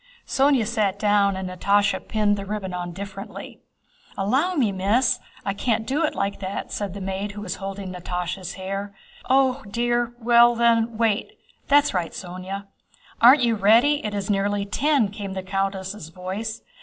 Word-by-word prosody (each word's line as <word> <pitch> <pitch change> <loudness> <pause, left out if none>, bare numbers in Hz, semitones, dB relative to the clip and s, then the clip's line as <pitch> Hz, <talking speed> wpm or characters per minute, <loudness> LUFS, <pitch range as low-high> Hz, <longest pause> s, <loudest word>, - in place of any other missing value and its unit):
Sónya 270 -4 +3
sat 210 -4 0
down 205 -1 +3
and 190 0 -4
Natásha 200 +2 +1
pinned 210 -2 +2
the 200 - -5
ribbon 195 -2 -4
on 175 -1 -4
differently. 195 +3 -8 0.6
"Allow 265 - +1
me, 245 -9 +2
Miss! 230 +7 +2 0.3
I 200 - 0
can't 220 +2 -1
do 285 +6 0
it 305 - 0
like 200 0 -2
that," 190 0 -5
said 200 -2 -4
the - - -5
maid 195 +2 -3
who 205 - -7
was 185 -4 -4
holding 195 -1 -6
Natásha's 180 +1 -4
hair. 195 +1 -5 0.3
"Oh, 265 0 +3
dear! 240 +2 0
Well 240 0 +5
then, 230 -1 +2
wait. 225 -1 0 0.3
That's 290 0 +4
right, 175 -3 -2
Sónya." 185 +2 -6 0.6
"Aren't 255 +3 +8
you 235 -1 +3
ready? 230 +8 +4
It 210 -1 -3
is 200 -1 -3
nearly 200 0 0
ten," 275 +1 +2
came 200 -1 -6
the 190 -1 -4
countess' 195 -1 -3
voice. 190 +6 -5
205 Hz, 165 wpm, -24 LUFS, 195-235 Hz, 0.6 s, Aren't